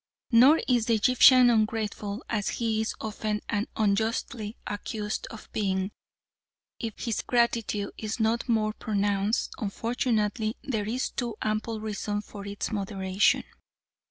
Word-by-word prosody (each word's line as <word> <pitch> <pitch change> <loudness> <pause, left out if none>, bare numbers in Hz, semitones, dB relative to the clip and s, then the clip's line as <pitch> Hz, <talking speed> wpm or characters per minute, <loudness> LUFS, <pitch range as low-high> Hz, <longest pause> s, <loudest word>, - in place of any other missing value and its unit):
Nor 260 +7 +7
is 240 -3 +2
the 230 - +4
Egyptian 250 +2 +7
ungrateful, 215 -1 -1
as 210 -3 -1
he 225 -2 0
is 220 - -2
often 215 -1 -2
and 205 -1 -1
unjustly 220 +1 -1
accused 210 +1 -4
of 225 - -10
being. 190 -2 -1 0.9
If 225 -2 -5
his 230 -3 -1
gratitude 230 -4 +1
is 215 +2 -4
not 225 +3 +1
more 215 -2 +2
pronounced, 205 -1 0
unfortunately 220 0 -1
there 220 -7 -2
is 250 +3 -1
too 240 -3 -3
ample 215 +1 -1
reason 210 -1 -3
for 200 -1 -9
its 200 +3 -4
moderation. 195 -2 +1
215 Hz, 130 wpm, -27 LUFS, 205-230 Hz, 0.9 s, Nor